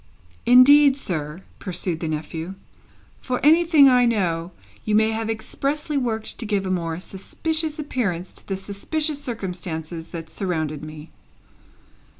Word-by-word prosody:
"Indeed, 275 +3 +7
sir," 160 - -4 0.2
pursued 180 -3 -1
the 165 - -3
nephew, 160 +3 -4 0.6
"for 250 -1 -2
anything 320 -2 +6
I 250 -2 +5
know, 175 -6 0 0.3
you 210 - 0
may 220 +1 +4
have 225 0 -3
expressly 280 +7 -3
worked 230 -5 -1
to 235 - -2
give 200 -2 0
a 185 - -2
more 165 -2 -2
suspicious 310 - -3
appearance 200 - -3
to - - -13
the 195 - -2
suspicious 285 +10 -2
circumstances 175 - -5
that 165 -1 -8
surrounded 160 -6 -3
me." 155 0 -10
200 Hz, 135 wpm, -23 LUFS, 170-265 Hz, 0.6 s, Indeed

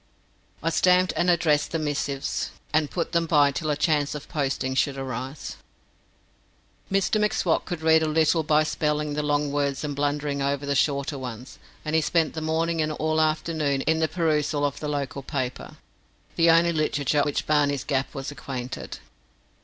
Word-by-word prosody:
I 165 - +1
stamped 180 +2 +3
and 175 - +2
addressed 155 -4 +2
these 165 - -1
missives, 145 -2 -2 0.2
and 155 -1 +2
put 170 -2 -3
them 170 -1 +1
by 145 -3 +4
till 155 +3 -3
a 150 - +2
chance 145 -1 +1
of 145 - -7
posting 135 -4 -1
should 135 +1 +1
arise. 130 +1 -5 1.3
Mr 195 +2 +2
M'Swat 190 -5 +1
could 175 -3 -5
read 160 0 +5
a 160 - +1
little 160 +1 +3
by 155 0 +3
spelling 150 -1 -1
the 150 - -1
long 145 -1 0
words 140 -1 -1
and 145 -1 -3
blundering 145 0 -1
over 140 +1 -1
the 140 - 0
shorter 140 0 0
ones, 125 0 -8 0.3
and 155 - -3
he 160 - +4
spent 160 +1 +1
the 160 - -4
morning 160 +1 0
and 155 0 0
all 155 +1 -1
the - - +4
afternoon 155 -3 0
in 160 +2 +1
perusal 150 -4 0
of 140 - -2
the 150 - -4
local 140 -1 -3
paper 130 -2 -4 0.6
the 165 0 +4
only 170 +1 +5
literature 150 -2 +1
with 145 - +3
which 145 - -1
Barney's 145 -2 +2
Gap 135 -1 -2
was 135 0 -4
acquainted. 130 -2 -6
150 Hz, 175 wpm, -25 LUFS, 140-160 Hz, 1.3 s, read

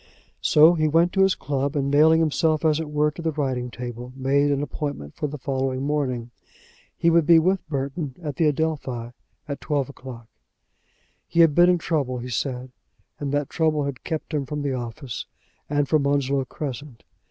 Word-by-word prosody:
So 160 0 +6
he 155 -2 +1
went 165 +3 +3
to 195 - +2
his 190 0 +4
club, 140 +1 -2
and 140 -1 0
nailing 160 +3 +5
himself 155 0 +1
as 155 -1 +3
it 160 -2 -4
were 150 0 +1
to 170 - -9
the 165 -1 0
writing 130 -4 -2
table, 120 0 -7
made 140 +2 +2
an 140 0 0
appointment 145 - -5
for 150 - -3
the 150 +1 -6
following 130 -1 -2
morning. 130 -5 -1 0.7
He 170 - +3
would 165 -2 +3
be 170 -1 +8
with 185 +1 +1
Burton 140 0 -3
at 150 -6 -5
the 160 - +3
Adelphi 140 -6 -2 0.4
at 140 -1 -5
twelve 145 -4 -1
o'clock. 125 -4 -10 1.0
He 170 - +3
had 165 -3 +6
been 175 +3 +6
in 180 - +4
trouble, 145 -7 -1
he 125 +1 -6
said, 125 +2 -3 0.5
and 145 -2 -3
that 145 -1 -1
trouble 155 -3 +1
had 140 -3 -5
kept 160 0 -4
him 140 -3 -1
from 150 +1 -4
the 140 -2 -1
office 120 +1 -5 0.4
and 145 -1 +1
from 150 -2 +2
Onslow 140 -1 +1
Crescent. 135 -2 -7
145 Hz, 185 wpm, -24 LUFS, 130-155 Hz, 1.0 s, be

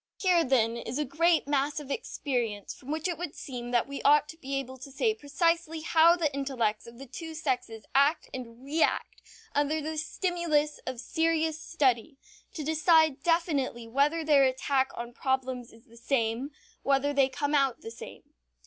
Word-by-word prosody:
Here, 360 -3 +3
then, 235 -4 +2
is 235 +2 -5
a 300 - 0
great 335 -1 +2
mass 285 +1 0
of 285 -2 -8
experience 240 - -3
from 265 - -14
which 315 +3 -1
it 350 -2 -3
would 350 -4 -5
seem 245 -3 -6
that 240 -1 +1
we 280 0 -6
ought 295 +1 +5
to 320 - -9
be 275 -3 -5
able 260 -1 -4
to 260 - -9
say 435 - +1
precisely 330 -1 0
how 330 +1 +5
the 315 -5 -1
intellects 250 -7 -1
of 235 0 -12
the 270 - -9
two 320 +5 -8
sexes 250 -8 -3
act 285 +4 +3
and 245 -1 -8
react 305 +4 0 0.3
under 290 +2 +1
the 310 +1 -3
stimulus 310 -2 0
of 255 -2 -4
serious 320 +3 0
study, 270 -2 0 0.4
to 310 - -4
decide 315 -1 +3
definitely 295 -8 0
whether 285 +7 +1
their 295 -3 +5
attack 265 +1 +1
on 235 0 -6
problems 260 -2 -2
is 225 +2 -19
the 235 -3 -18
same, 235 +1 -1 0.3
whether 280 +1 +1
they 275 -2 +3
come 285 +2 -2
out 275 -4 +2
the 225 - -7
same. 235 - -10
280 Hz, 175 wpm, -29 LUFS, 255-315 Hz, 0.4 s, ought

